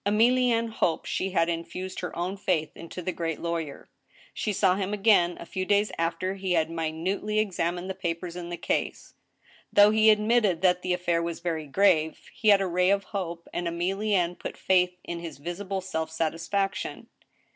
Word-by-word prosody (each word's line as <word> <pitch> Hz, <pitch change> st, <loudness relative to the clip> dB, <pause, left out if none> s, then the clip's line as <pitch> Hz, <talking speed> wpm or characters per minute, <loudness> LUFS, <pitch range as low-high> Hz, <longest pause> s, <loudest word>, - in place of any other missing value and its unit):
Emllienne 230 Hz, +2 st, +3 dB
hoped 170 Hz, -6 st, 0 dB
she 190 Hz, -, -1 dB
had 165 Hz, -3 st, +2 dB
infused 175 Hz, +2 st, -4 dB
her 180 Hz, -, -5 dB
own 180 Hz, +3 st, -2 dB
faith 185 Hz, -6 st, -1 dB
into 170 Hz, +2 st, -8 dB
the 185 Hz, -, -1 dB
great 165 Hz, -3 st, -3 dB
lawyer. 165 Hz, -4 st, -4 dB, 0.5 s
She 215 Hz, -, -2 dB
saw 190 Hz, -2 st, +3 dB
him 200 Hz, +1 st, -2 dB
again, 195 Hz, -4 st, +4 dB
a -, -, -8 dB
few 185 Hz, +2 st, -3 dB
days 205 Hz, +2 st, +2 dB
after 170 Hz, +3 st, -1 dB
he 190 Hz, -2 st, -2 dB
had 160 Hz, -1 st, +1 dB
minutely 165 Hz, +6 st, -2 dB
ex 210 Hz, -4 st, 0 dB
amined 175 Hz, +2 st, -1 dB
the 190 Hz, -, -3 dB
papers 175 Hz, -2 st, -4 dB
in 175 Hz, -1 st, -6 dB
the 175 Hz, -, -4 dB
case. -, -, -2 dB, 0.6 s
Though 205 Hz, +1 st, +7 dB
he 220 Hz, 0 st, +5 dB
admitted 210 Hz, -4 st, +3 dB
that 180 Hz, -1 st, +4 dB
the 180 Hz, -, 0 dB
affair 175 Hz, -2 st, 0 dB
was 170 Hz, -1 st, -3 dB
very 165 Hz, -3 st, -3 dB
grave, 160 Hz, -2 st, +3 dB
he 220 Hz, -, -3 dB
had 200 Hz, -2 st, +7 dB
a -, -, +1 dB
ray 180 Hz, +1 st, +2 dB
of 200 Hz, 0 st, +2 dB
hope, 170 Hz, -4 st, -5 dB
and 175 Hz, -, -2 dB
Emilienne 180 Hz, +1 st, 0 dB
put -, -, -6 dB
faith 180 Hz, -1 st, +2 dB
in 170 Hz, 0 st, -5 dB
his 170 Hz, -4 st, -7 dB
visible 185 Hz, +5 st, -4 dB
self 160 Hz, -4 st, -3 dB
satisfaction. 165 Hz, +5 st, -2 dB
180 Hz, 185 wpm, -27 LUFS, 170-200 Hz, 0.6 s, Though